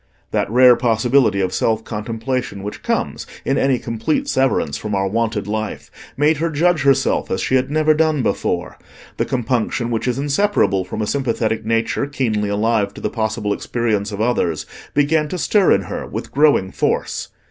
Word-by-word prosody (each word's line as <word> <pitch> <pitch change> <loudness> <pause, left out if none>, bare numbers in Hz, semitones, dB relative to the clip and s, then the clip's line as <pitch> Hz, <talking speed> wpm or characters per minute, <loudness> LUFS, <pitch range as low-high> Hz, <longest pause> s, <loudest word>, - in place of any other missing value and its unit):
That - - 0
rare 125 +2 +7
possibility 120 -2 +2
of 95 -1 -1
self 110 -1 0
contemplation 115 0 -4
which 105 - -6
comes - - -2 0.2
in 135 - +1
any 135 -2 +2
complete 115 +7 -2
severance 130 - +1
from 105 -1 -3
our 95 0 +1
wonted 110 0 -1
life 110 +1 -4 0.3
made 150 +2 +3
her 165 +3 0
judge 165 +1 +2
herself 135 -1 +2
as 95 - -1
she 130 - -2
had 130 0 +2
never 155 +1 +3
done 155 -3 +1
before: - - -2 0.4
the - - 0
compunction 120 -1 -1
which 115 +2 -1
is 125 0 0
inseparable 140 - +1
from 105 +4 -4
a - - 0
sympathetic 115 -4 -1
nature 115 +4 0
keenly 110 -7 -1
alive 105 -1 0
to - - -9
the 105 - -2
possible 110 -2 -1
experience 110 -3 -1
of 100 - -6
others, 100 -9 0 0.3
began 150 +2 +2
to 180 - -4
stir 195 +2 +3
in 100 - +4
her - - -5
with - - -6
growing 140 -10 +3
force. - - -1
115 Hz, 175 wpm, -19 LUFS, 105-140 Hz, 0.4 s, rare